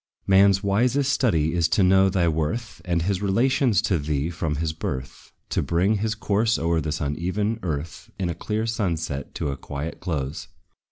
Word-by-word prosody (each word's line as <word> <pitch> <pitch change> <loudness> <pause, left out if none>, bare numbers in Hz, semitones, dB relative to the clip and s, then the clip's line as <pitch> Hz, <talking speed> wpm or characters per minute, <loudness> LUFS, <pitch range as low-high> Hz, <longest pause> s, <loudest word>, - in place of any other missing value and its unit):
Man's 95 0 +5
wisest 125 +7 +2
study 80 - +2
is 85 -2 +2
to 90 +4 +2
know 95 +1 +5
thy 90 -3 +1
worth 80 +9 -2
And 85 -2 0
his 95 +1 -1
relations 115 +1 +2
to 95 -6 +1
thee 75 +2 -1
from 80 -3 -2
his 80 +1 -2
birth; 65 -4 -6 0.2
To - - 0
bring 95 +6 +1
his 110 +2 -1
course 110 +1 +1
o'er 80 0 +1
this 75 -1 -3
uneven 90 +9 -1
earth, 80 -2 -5
In 95 - -1
a 85 - -1
clear 105 +6 -2
sunset, 85 - -2
to - - -2
a 70 - -5
quiet 75 +3 -6
close. 75 -3 -3
90 Hz, 175 wpm, -24 LUFS, 80-105 Hz, 0.2 s, Man's